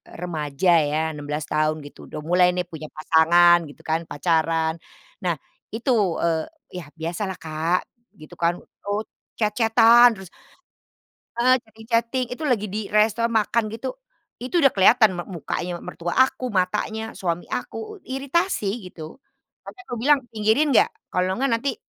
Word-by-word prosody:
remaja 165 -1 -2
ya, 150 +1 0
16 150 0 -4
tahun 155 0 0
gitu, 145 - -12
udah - - -7
mulai 180 +3 +4
nih 180 - 0
punya 155 -1 -7
pasangan 170 +2 +5
gitu 145 - -14
kan, 160 +1 0
pacaran. 160 +1 +1 0.5
Nah, 175 -2 +1 0.4
itu, 235 +4 -1 0.3
eee, 165 -1 +1 0.3
yah 165 -5 -8
biasa 170 +4 -4
lah 190 - -4
Kak, 160 +3 0 0.4
gitu 155 +3 -12
kan, 170 0 +2
eee, 205 +1 -5 0.3
chat-chat-an 225 +2 +5
terus, 190 - -11 1.1
eee, 255 +1 +6
chatting 220 -1 -16
chatting, 235 +3 +1
itu 285 - -8
lagi 230 -6 +1
di 210 - -2
resto 215 +2 +2
makan 225 0 +1
gitu, 250 +4 -4 0.5
itu 255 +7 -5
udah 275 - +6
kelihatan 220 +3 +6
m - - -1
mukanya 175 0 -4
mertua 175 -1 -5
aku, 255 -1 -3
matanya, 210 +3 -1
suami 175 -2 -3
aku, - - -4 0.3
i 260 - -4
iritasi, 265 - -1
gitu. 160 +5 -11 0.5
Sampe 375 - -10
kubilang, 270 +5 +3
"Pinggirin 220 +7 +2
nggak? 240 - +5 0.2
Kalau 185 +1 0
nggak 270 +3 0
nanti" 270 0 -2
185 Hz, 150 wpm, -23 LUFS, 165-230 Hz, 1.1 s, eee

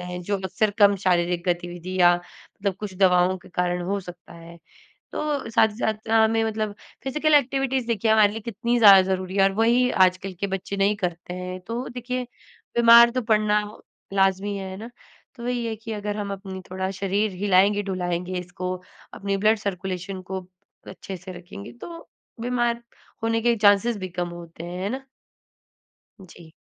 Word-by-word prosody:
हैं 180 0 -6
जो 200 +3 -1
अक्सर 195 +3 0
कम 205 -1 +6
शारीरिक 175 -1 +2
गतिविधि 175 +1 -3
या 175 0 +7
मतलब 190 +2 -6
कुछ 205 -3 -5
दवाओं 185 -1 +4
के - - -17
कारण 180 0 -1
हो 200 - 0
सकता 175 -2 -12
है। 170 0 -12 0.6
तो 290 -6 -2
साथ 220 -1 +4
ही 210 - -10
साथ 220 -1 -3
अ, - - -1
हमें 225 0 +2
मतलब 215 -1 -2 0.3
फिजिकल 305 +3 +1
एक्टिविटीज़ 265 -2 +1
देखिए 220 -1 +1
हमारे 215 -2 +5
लिए 225 - -6
कितनी 235 +3 -1
ज़्यादा 200 -4 +9
ज़रूरी 185 +1 -4
है 195 - +5
और 195 - +4
वही 245 +2 +4 0.2
आजकल 185 +1 -8
के 200 - -1
बच्चे 195 +1 -4
नहीं 200 +2 +2
करते 175 +1 -6
हैं। 180 0 -5
तो 235 +3 -3
देखिए 250 +1 -4 0.5
बीमार 235 0 +8
तो 255 - -1
पड़ना 210 -1 +3 0.5
लाजमी 195 +1 +1
है, 190 -1 -6
है 190 - -7
ना? 225 +4 -8 0.5
तो 235 - -10
वही 245 -1 -1
है 225 -1 -2
कि 225 +1 -9
अगर 210 0 -4
हम 200 -1 -3
अपनी 190 -1 -7
थोड़ा 190 0 -2
शरीर 195 +2 -1
हिलाएँगे, 205 +1 +4
ढुलाएँगे 180 -2 -3
इसको, 180 +1 -5 0.4
अपनी 200 0 -2
ब्लड 215 +2 +3
सर्कुलेशन 190 -1 -4
को 190 +1 -5 0.5
अच्छे 190 -1 -8
से 185 +2 -10
रखेंगे, 180 +3 -10
तो 335 +7 -10 0.3
बीमार 240 -1 0 0.4
होने 225 0 +1
के 235 0 +3
चाँसेस 205 +2 +4
भी 190 -2 -5
कम 175 0 -3
होते 170 -1 -10
हैं, 175 +1 -6
है 200 - -1
ना। 265 +4 -4 1.2
जी। 170 -2 -15
200 Hz, 180 wpm, -24 LUFS, 185-225 Hz, 1.2 s, ज़्यादा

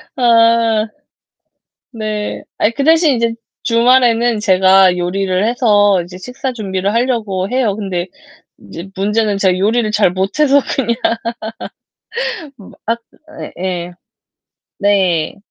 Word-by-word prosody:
아 230 -2 +3 1.0
네. 215 -3 -4
아이 210 - +2
그 275 +4 -3
대신 320 -2 +4
이제 230 -1 0 0.3
주말에는 235 -1 +3
제가 190 -2 +4
요리를 185 +2 -1
해서 205 -5 +3
이제 180 +1 -11
식사 250 +7 -5
준비를 195 -3 -2
하려고 225 -6 -1
해요. 245 -5 0
근데 185 -4 -3 0.5
이제 165 - -10
문제는 210 +1 0
제가 190 -2 +2
요리를 215 +3 +1
잘 210 -4 +2
못해서 270 +10 +2 0.2
그냥 235 -3 0 1.9
앗. 230 +1 -1 0.6
예예. 180 -1 -4 0.9
네. 185 -6 +1
210 Hz, 210 characters per minute, -16 LUFS, 190-235 Hz, 1.9 s, 대신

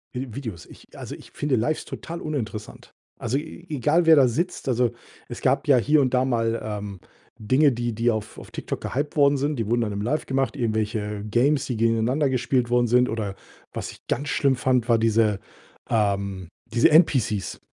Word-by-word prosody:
Vi 125 -3 -5
Videos. 110 -11 -6
Ich - - -17
äh, - - -13
also, - - -7
ich - - -15
finde 145 -2 -1
Lives 125 +7 -1
total 170 +1 -7
uninteressant. 115 -8 -5 0.3
Also 120 +4 -1
e 160 +3 -8
egal, 150 +4 +2
wer 160 0 +8
da 135 -3 +6
sitzt. 170 +7 -2
Also, 120 -1 +2 0.4
es 120 - -7
gab 135 +3 +1
ja 140 -3 +6
hier 145 +5 +3
und 130 -2 0
da 130 0 +3
mal, 115 -3 0
ähm, 105 -3 -5 0.4
Dinge, 130 +7 +3
die 120 -1 -2
die 115 +2 +1
auf 110 -1 -5
auf - - -11
TikTok - - -5
gehyped 145 +3 -3
worden 140 -1 +5
sind. 145 0 -1
Die 115 - -2
wurden 120 +2 +1
dann 110 - -1
im 100 0 -3
Live 145 +9 -1
gemacht. 130 -3 -1
Irgendwelche 105 -3 -2
Games, 135 +6 +2
die 125 - -3
gegeneinander 115 +6 +2
gespielt 125 -1 0
worden 120 0 +3
sind 125 +2 +3
oder 105 -4 -3 0.4
was - - -5
ich - - -18
ganz 145 +4 -2
schlimm 135 -2 +2
fand, 125 -1 +1
war 115 - +5
diese 110 -2 +2 0.5
ähm, 100 -4 0 0.3
diese 120 - +5
NPCs. 130 - +2
120 Hz, 195 wpm, -24 LUFS, 110-140 Hz, 0.5 s, wer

